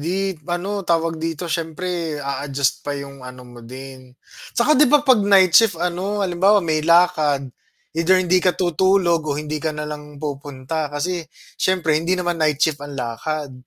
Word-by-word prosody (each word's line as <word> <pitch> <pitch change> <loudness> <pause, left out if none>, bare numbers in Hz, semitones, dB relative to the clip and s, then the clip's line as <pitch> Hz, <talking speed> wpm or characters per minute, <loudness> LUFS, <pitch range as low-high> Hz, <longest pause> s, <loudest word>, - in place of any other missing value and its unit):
'di 170 +5 -2 0.3
ano 190 +4 -2
tawag 165 -3 0
dito, 165 0 -3
siyempre 165 0 -3
a-adjust 140 -1 -2
pa 145 0 -4
'yong 140 -1 -9
ano 125 0 -10
mo 120 -1 -13
din. 130 +1 -11 0.4
'Tsaka, 240 +6 +4
'di 300 -2 +5
ba, 295 +1 +4
'pag 260 -6 +5
night 195 -3 +5
shift, 215 -2 +5
ano, 185 +4 -2
halimbawa 190 +2 +3
may 155 -2 0
lakad, 155 -5 +2 0.4
either 165 +3 +3
hindi 185 0 +2
ka 180 0 +1
tutulog 180 0 +2
o 140 - -1
hindi 150 0 -4
ka 155 0 -3
na 150 - -4
lang 150 -1 -8
pupunta. 145 +1 -4
Kasi 170 +5 -2 0.4
syempre 160 -5 +1
hindi 175 +3 0
naman 175 -2 -2
night 155 -2 +2
shift 150 0 +1
ang 145 -1 -8
lakad. 135 +4 -4
160 Hz, 170 wpm, -21 LUFS, 145-180 Hz, 0.4 s, di